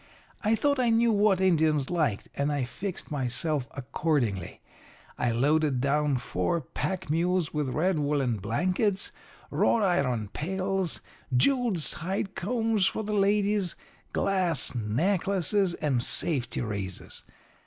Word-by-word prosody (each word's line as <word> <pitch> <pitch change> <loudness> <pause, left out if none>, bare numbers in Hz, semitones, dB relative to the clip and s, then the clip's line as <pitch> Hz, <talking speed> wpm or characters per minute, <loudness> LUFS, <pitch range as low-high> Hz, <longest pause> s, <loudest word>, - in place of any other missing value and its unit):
I 220 +1 +2
thought 285 +4 +1
I 245 -2 +3
knew 230 +1 +4
what 205 -2 +3
Indians 160 -6 +2
liked, 155 - 0
and 140 +1 0
I 145 -2 0
fixed 185 +9 -6
myself 140 +1 -1
accordingly. 125 - -2 0.6
I 125 - 0
loaded 140 +3 +2
down 140 +1 +1
four 105 - -1
pack 185 +3 -4
mules 175 +1 +1
with 150 -3 -1
red 165 +5 +1
woollen 140 -5 0
blankets, 180 - 0 0.4
wrought 225 - +2
iron 130 - +1
pails, 190 - -2 0.4
jewelled 245 - +2
side 190 +6 +1
combs 225 -1 +1
for 220 - -2
the 210 0 -3
ladies, 205 -2 +2 0.4
glass 180 - +1
necklaces, 180 - +1
and 130 -5 0
safety 130 -6 +1
razors. 100 -5 -4
165 Hz, 120 wpm, -28 LUFS, 135-195 Hz, 0.6 s, knew